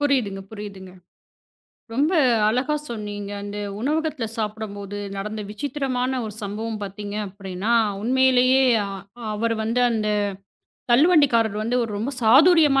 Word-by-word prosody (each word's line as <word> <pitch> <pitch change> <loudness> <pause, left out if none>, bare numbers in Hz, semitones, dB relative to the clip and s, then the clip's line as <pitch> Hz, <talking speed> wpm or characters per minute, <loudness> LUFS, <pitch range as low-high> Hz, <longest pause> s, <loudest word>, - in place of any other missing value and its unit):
புரியுதுங்க, 255 -9 +1
புரியுதுங்க. 200 -3 -9 1.0
ரொம்ப 295 +7 +2 0.4
அழகா 255 +7 +1 0.2
சொன்னீங்க. 205 -3 -5
அந்த 205 0 -6 0.2
உணவகத்துல 300 -2 -1
சாப்பிடும்போது 205 -2 -5 0.2
நடந்த 210 +2 -4
விசித்திரமான 260 +1 -2
ஒரு 210 -1 -6
சம்பவம் 215 +2 -4
பாத்தீங்க 205 +1 -6
அப்டின்னா 195 +2 -4 0.3
உண்மையிலேயே 260 +1 +4 0.7
அவர் 230 +2 0
வந்து 230 +3 0
அந்தத் 210 -2 0 0.7
தள்ளுவண்டி 300 +2 +6
காரர் 220 -2 +2
வந்து 235 +3 0
ஒரு 225 - -3
ரொம்ப 240 +6 -2
சாதுர்யமா 290 +3 +6
225 Hz, 110 wpm, -23 LUFS, 205-260 Hz, 1.0 s, தள்ளுவண்டி